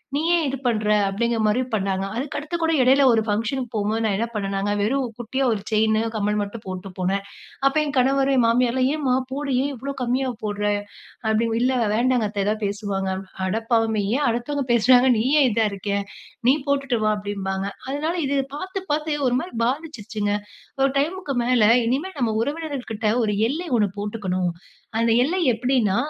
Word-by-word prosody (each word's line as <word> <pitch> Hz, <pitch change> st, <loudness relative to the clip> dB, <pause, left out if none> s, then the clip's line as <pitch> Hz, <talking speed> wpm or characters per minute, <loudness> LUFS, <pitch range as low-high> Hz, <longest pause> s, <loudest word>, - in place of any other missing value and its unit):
நீ 290 Hz, -, +1 dB
ஏன் 340 Hz, -1 st, +3 dB
இது 270 Hz, 0 st, -2 dB
பண்ற? 215 Hz, -3 st, +1 dB, 0.2 s
அப்பிடிங்கிறமாரி 220 Hz, +3 st, +1 dB
பண்ணாங்க. 195 Hz, -2 st, 0 dB
அதுக்கு 270 Hz, +4 st, -3 dB
அடுத்துகூட 325 Hz, +2 st, -1 dB
இடையில 265 Hz, +2 st, +5 dB
ஒரு 225 Hz, -, +3 dB
ஃபங்ஷனுக்கு 230 Hz, +4 st, -1 dB
போம்போது, 215 Hz, +2 st, 0 dB
நான் 205 Hz, -3 st, +1 dB
என்ன 230 Hz, +3 st, -1 dB
பண்ணேனாங்க 195 Hz, 0 st, -1 dB
வெறும் 255 Hz, +5 st, +1 dB
குட்டியா 245 Hz, +3 st, -2 dB
ஒரு 205 Hz, -, -4 dB
செயினு, 220 Hz, 0 st, +3 dB
கம்மல் 210 Hz, 0 st, 0 dB
மட்டும் 205 Hz, +2 st, -6 dB
போட்டு 185 Hz, 0 st, -6 dB
போனேன். 195 Hz, +2 st, 0 dB, 0.4 s
அப்ப 275 Hz, -, +1 dB
என் 290 Hz, -1 st, -4 dB
கணவர், 270 Hz, +2 st, +3 dB
என் 250 Hz, -, +4 dB
மாமியார்லாம், 250 Hz, +2 st, +2 dB
ஏன்ம்மா 280 Hz, -5 st, +1 dB, 0.2 s
போடு! 280 Hz, +1 st, -3 dB
ஏன் 285 Hz, -, -1 dB
இவ்ளோ 275 Hz, +3 st, -5 dB
கம்மியா 255 Hz, +2 st, 0 dB
போட்ற? 205 Hz, -1 st, -3 dB, 0.7 s
அப்பிடி 220 Hz, +1 st, +2 dB
இல்ல 255 Hz, +2 st, +2 dB, 0.2 s
வேண்டாங்க 245 Hz, 0 st, +2 dB
அத்த. 200 Hz, -1 st, -2 dB
எதாவது 215 Hz, +1 st, -1 dB
பேசுவாங்க. 200 Hz, -1 st, -2 dB, 0.4 s
அடப்பாவமே! 225 Hz, +1 st, +1 dB
ஏன் 290 Hz, -, +1 dB
அடுத்தவங்க 260 Hz, +5 st, -2 dB
பேசுறாங்கனு 250 Hz, +2 st, +5 dB
நீ 225 Hz, -, 0 dB, 0.2 s
ஏன் 275 Hz, -, +5 dB
இதா 220 Hz, 0 st, +2 dB
இருக்கே? 200 Hz, +1 st, -2 dB, 0.5 s
நீ 265 Hz, -, +7 dB
போட்டுட்டு 275 Hz, -4 st, +1 dB
வா! 215 Hz, -, +3 dB
அப்பிடிம்பாங்க. 195 Hz, -1 st, -3 dB, 0.2 s
அதனால 300 Hz, +5 st, -1 dB
இது 280 Hz, +1 st, 0 dB, 0.2 s
பார்த்து, 375 Hz, +5 st, -4 dB
பார்த்து 300 Hz, 0 st, -1 dB
ஒருமாரி 255 Hz, +8 st, -1 dB
பாதிச்சிருச்சுங்க. 230 Hz, -7 st, -2 dB, 0.5 s
ஒரு 270 Hz, -, +4 dB
டைம்க்கு 325 Hz, 0 st, -2 dB
மேல, 245 Hz, -2 st, +3 dB, 0.2 s
இனிமே 290 Hz, +11 st, -1 dB
நம்ம 230 Hz, -4 st, 0 dB
உறவினர்கள்கிட்ட 280 Hz, -7 st, -3 dB, 0.2 s
ஒரு 210 Hz, -, 0 dB, 0.2 s
எல்லை 335 Hz, +5 st, -4 dB
ஒன்னு 205 Hz, -3 st, +2 dB
போட்டுக்கணும். 190 Hz, -4 st, -2 dB, 0.5 s
அந்த 230 Hz, 0 st, +3 dB
எல்லை 330 Hz, +9 st, 0 dB
எப்பிடின்னா, 235 Hz, -3 st, +1 dB
235 Hz, 165 wpm, -23 LUFS, 210-275 Hz, 0.7 s, நீ